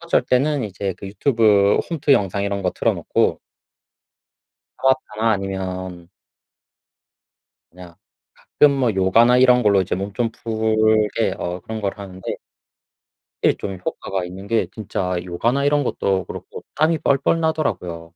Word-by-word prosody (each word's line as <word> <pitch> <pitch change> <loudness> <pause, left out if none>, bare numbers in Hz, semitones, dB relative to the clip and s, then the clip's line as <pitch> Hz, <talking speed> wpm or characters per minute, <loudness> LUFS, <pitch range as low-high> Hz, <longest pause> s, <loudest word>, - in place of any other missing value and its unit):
어쩔 170 -5 +1
때는 130 +2 +1
이제 95 -2 -4
그 100 - -8
유튜브 105 -3 +3
홈트 150 -3 +2
영상 100 -3 +1
이런 100 -1 -2
거 90 - +1
틀어 - - +1
놓고 - - 0 1.4
타바타나 130 -4 +1
아니면 95 -3 -5 1.6
그냥 90 -1 -13 0.4
가끔 150 - +3
뭐 130 -5 +1
요가나 115 +6 +4
이런 125 -1 +5
걸로 100 -2 +4
이제 95 - -3
몸 100 +2 -4
좀 115 +1 0
풀게 110 -2 +1
어 90 +1 -4
그런 110 0 -6
걸 100 -1 -1
하는데 95 -2 -6 1.1
예 - - +4
좀 95 -2 -6
효과가 95 -2 -3
있는 95 +2 -9
게 115 +2 +1
진짜 95 -4 -3
요가나 120 +10 0
이런 145 0 +2
것도 95 -7 -1
그렇고 - - -9
땀이 155 +2 +2
뻘뻘 140 +4 +1
나더라고요. 90 - -2
105 Hz, 270 characters per minute, -21 LUFS, 95-125 Hz, 1.6 s, 이런